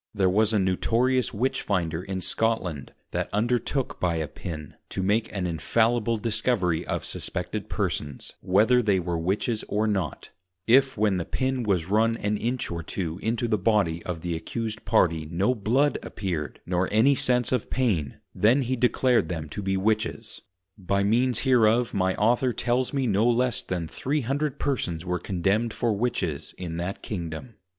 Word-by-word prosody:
There 95 -2 +3
was 110 +2 +3
a 110 - +2
notorious 115 +6 +1
Witchfinder 95 -8 -1
in 95 0 -4
Scotland, 90 -11 -1 0.2
that - - -2
undertook 120 +5 0
by 85 -2 +1
a 80 -2 -2
Pin, 75 -3 -7 0.2
to 95 - -3
make 110 +3 +1
an 95 -3 -2
infallible 115 +7 +1
Discovery 105 -6 0
of - - -2
suspected - - -4
Persons, 70 -2 -3
whether 110 +7 +4
they 100 -5 +2
were 85 -1 -2
Witches 105 +6 -1
or 105 +1 0
not, 95 -9 -2 0.3
if 135 +2 +4
when 105 -2 +2
the 85 - -1
Pin 130 +6 -1
was 95 -7 +1
run 110 +3 +2
an 105 -1 -1
Inch 120 +1 -2
or 85 0 -3
two 85 +1 -4
into 115 +2 -1
the 110 -2 +1
Body 95 -5 +2
of 85 -2 -5
the 85 -1 -2
accused 110 +6 -4
Party 80 -8 +2
no 95 +8 +1
Blood 130 +6 +1
appeared, 85 -7 -4
nor 90 +1 0
any 115 +7 +5
sense 125 -2 +1
of 125 -4 -1
Pain, 95 - 0 0.2
then 125 +6 +3
he 130 +1 -1
declared 125 -6 +2
them 80 -3 -4
to 105 - -5
be 95 -1 0
Witches; 110 +2 -1 0.4
by 100 +1 0
means 120 +3 +2
hereof 120 -2 +3
my 95 -1 +1
Author 120 +4 +2
tells 120 +2 0
me 135 -2 0
no 110 +1 +3
less 125 0 +1
then 85 -3 -3
300 140 - -1
persons 90 - -2
were 90 0 -1
Condemned 100 +5 0
for 115 -2 +1
Witches 100 -9 -2
in 85 -2 -5
that 90 +3 -4
Kingdom. 85 +3 -5
105 Hz, 165 wpm, -26 LUFS, 90-120 Hz, 0.4 s, any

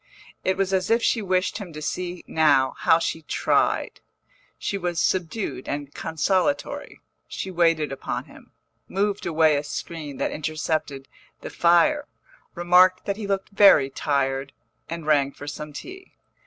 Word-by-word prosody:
It 185 0 0
was 195 0 0
as 185 -1 +1
if 230 +1 +3
she 230 - +2
wished 185 +1 0
him 195 -5 -8
to 155 - -7
see 175 +3 -4
now 140 -4 +3
how 160 - +5
she 165 -1 -2
tried. 155 - 0 0.6
She - - -3
was 175 -3 -2
subdued 185 - -1
and 145 0 -4
consolatory, 190 - -1 0.3
she 190 - -5
waited 165 -4 +2
upon 135 - -4
him, - - -17 0.4
moved 200 +1 -1
away 160 -2 +3
a 145 - -2
screen 150 -1 -6
that - - -1
intercepted 155 -2 -3 0.3
the - - -7
fire, 175 - +3 0.5
remarked 180 +1 +4
that 200 0 -2
he 215 -2 -5
looked 195 -1 -2
very 195 -9 +6
tired, 135 -1 -1 0.4
and 165 -1 -5
rang 140 -2 +2
for 145 - -10
some 150 +1 -6
tea. 375 - -10
170 Hz, 150 wpm, -24 LUFS, 150-190 Hz, 0.6 s, very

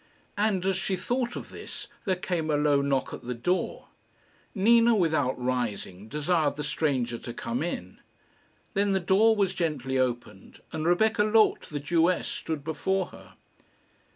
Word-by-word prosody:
And 205 -3 +1
as 190 -1 +1
she 190 0 -1
thought 245 +6 -2
of - - -7
this - - -7 0.2
there 190 -2 +2
came 175 -3 -2
a 150 - +2
low 145 -1 +3
knock 140 -1 0
at - - -7
the 125 +1 -4
door. 180 +11 -2 0.7
Nina, 230 +3 +5
without 155 -9 +1
rising, 115 -6 -3
desired 150 +3 +1
the 150 - -4
stranger 135 -6 -1
to 120 - -7
come 120 +3 -3
in. 95 - -4 0.7
Then 200 0 +2
the 190 - +2
door 200 +5 +4
was 195 -3 +1
gently 135 -7 -1
opened, 120 -6 -3
and 160 0 -2
Rebecca 215 +5 +3
Loth 215 0 +3
the 150 - -3
Jewess 165 +5 +2
stood 155 -3 -4
before 185 +4 -1
her. - - -14
160 Hz, 155 wpm, -27 LUFS, 130-190 Hz, 0.7 s, Nina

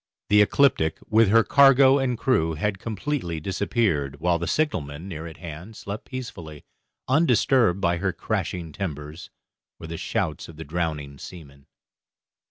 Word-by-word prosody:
The 105 0 +6
'Ecliptic', 105 - +3
with 110 -1 +5
her 115 +2 +5
cargo 135 0 +6
and 125 -3 -1
crew, 90 -11 +1
had 100 +5 -2
completely 110 - -3
disappeared, 90 - -1
while 85 +1 +1
the 85 - -3
signalman, 85 - -2
near 85 -3 -6
at 80 - -11
hand, 85 +5 -9
slept 100 +1 -7
peacefully, 90 - -8 0.4
undisturbed 130 - +3
by 85 -1 +1
her 95 +2 -1
crashing 85 -2 -3
timbers, 75 -1 -6 0.5
or - - -9
the 80 0 -6
shouts 75 0 -3
of 80 - -11
the 80 - -6
drowning 75 -3 -3
seamen. 70 -6 -12
90 Hz, 145 wpm, -24 LUFS, 80-115 Hz, 0.5 s, The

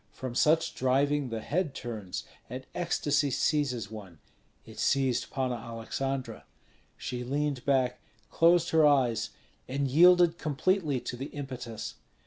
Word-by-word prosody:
From 130 -2 -6
such 155 +6 +3
driving 140 +2 +1
the 115 -1 -4
head 155 +2 -1
turns, 110 -6 -5 0.3
and 130 +2 -6
ecstasy 145 -4 +1
seizes 125 -6 0
one; 100 -6 -9 0.5
it - - -12
seized 130 -3 +1
Panna 130 -2 -1
Aleksandra. 120 +4 -4 0.5
She 125 0 -4
leaned 140 0 -1
back, 130 -3 +1 0.3
closed 170 +1 +4
her 160 -1 +5
eyes, 135 -6 +3 0.4
and 140 +2 -1
yielded 175 +4 +6
completely 155 -1 0
to - - -5
the 135 +3 -5
impetus. 130 -6 -6
135 Hz, 125 wpm, -29 LUFS, 125-150 Hz, 0.5 s, yielded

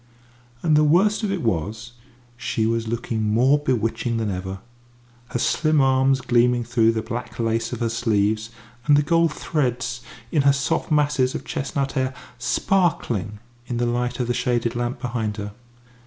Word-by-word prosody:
And 155 -3 +3
the 150 - +5
worst 190 +9 +3
of 210 -3 -1
it 190 -6 -2
was, 110 +3 -2 0.4
she 120 -3 -1
was 115 0 0
looking 115 -1 -2
more 120 +7 +3
bewitching 120 -3 -1
than 110 -2 -1
ever; 95 +1 -4 0.7
her 120 - -3
slim 155 +4 +2
arms 135 0 +3
gleaming 120 0 +2
through 115 -1 +2
the 110 -1 -2
black 120 0 -6
lace 115 0 0
of - - -5
her 115 - +1
sleeves, 110 -2 0 0.4
and 145 -1 +6
the 145 - +3
gold 165 +1 +3
threads 125 -6 -2 0.3
in 150 - +3
her 140 0 +5
soft 140 +3 -1
masses 145 -4 +2
of - - -5
chestnut 135 0 -2
hair 130 0 -1 0.2
sparkling 120 - 0 0.3
in 120 - -3
the 120 - +1
light 120 +1 -1
of 125 - +1
the 120 - 0
shaded 120 -1 0
lamp 120 +1 -2
behind 115 -4 -3
her. 105 0 -5
120 Hz, 170 wpm, -23 LUFS, 115-135 Hz, 0.7 s, and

